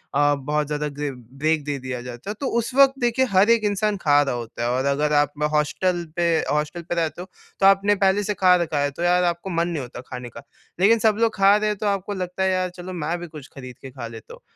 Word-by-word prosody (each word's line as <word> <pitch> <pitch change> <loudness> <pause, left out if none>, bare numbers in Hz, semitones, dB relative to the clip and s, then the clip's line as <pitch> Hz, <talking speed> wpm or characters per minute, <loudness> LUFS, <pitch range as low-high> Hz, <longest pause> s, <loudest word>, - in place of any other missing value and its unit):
अ, 145 0 +3
बहुत 150 +2 -2
ज़्यादा 150 0 -2
ग 145 -1 -2 0.3
ब्रेक 155 -1 +1
दे 145 -1 -2
दिया 125 -1 -5
जाता 125 +8 -8
है। - - -2
तो 275 - -2
उस 235 +2 -4
वक़्त 275 0 +5
देखिए 240 +2 +2
हर 195 +4 +4
एक 230 -2 +4
इंसान 205 0 0
खा 145 -1 +4
रहा 140 -4 -1
होता 120 0 -6
है 120 - 0
और 130 +2 0
अगर 150 +2 +1
आप 145 -1 +3 0.2
हॉस्टल 175 +4 0
पे, 170 -2 +2
हॉस्टल 150 +3 -2
पे 170 +1 -4
रहते 165 0 -2
हो, 185 - -8 0.3
तो 195 - +3
आपने 195 +1 +5
पहले 195 +1 +2
से 210 - -1
खा 185 -1 +4
रखा 160 -4 -1
है 145 0 0
तो 170 - -6
यार 180 0 +3
आपको 175 +2 -1
मन 170 0 0
नहीं 165 -5 -3
होता 120 -1 -8
खाने 125 -1 -7
का। 115 - -11 0.4
लेकिन 220 +4 +5
सब 215 -1 +3
लोग 230 -1 +1
खा 195 +1 +5
रहे 215 0 0
हैं 210 - -2
तो 210 - -2
आपको 200 0 -1
लगता 185 0 -3
है 190 - +2
यार 185 0 0
चलो 185 +1 -8
मैं 165 +1 -2
भी 175 - -7
कुछ 150 -4 -11
खरीद 130 -2 -10
के 135 - -9
खा 120 -3 -7
लेता 115 -1 -11
हूँ। - - -14
170 Hz, 265 wpm, -23 LUFS, 145-195 Hz, 0.4 s, वक़्त